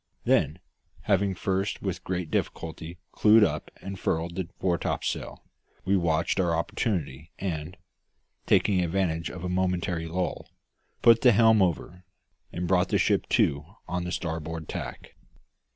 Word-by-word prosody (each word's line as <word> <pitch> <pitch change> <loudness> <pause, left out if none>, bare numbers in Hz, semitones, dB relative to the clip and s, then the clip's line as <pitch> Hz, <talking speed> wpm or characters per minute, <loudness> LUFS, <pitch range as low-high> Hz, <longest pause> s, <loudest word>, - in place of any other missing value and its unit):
Then, - - +2 0.4
having 100 -1 +1
first 95 +2 -2
with 95 -2 -3
great 90 -3 -3
difficulty 80 +1 -3
clewed 110 +1 +6
up - - -1
and 95 -1 -6
furled 85 +1 -1
the 90 -3 -3
fore 85 -3 +1
topsail, - - -3 0.4
we 95 +1 +3
watched 85 0 +1
our 85 -3 +2
opportunity 80 - -2
and, 85 -1 -4 0.7
taking 95 -3 +3
advantage 85 -2 -1
of 90 - -8
a - - -2
momentary 90 -2 -1
lull, 90 +2 -3 0.5
put 115 -1 +7
the 125 -2 +6
helm 110 0 +5
over, 90 0 -1 0.5
and 90 +1 -3
brought 90 0 +2
the - - +2
ship - - +1
to 70 +1 +2 0.2
on 90 0 -2
the 90 - -4
starboard 80 -2 -4
tack. - - -7
90 Hz, 140 wpm, -27 LUFS, 80-95 Hz, 0.7 s, put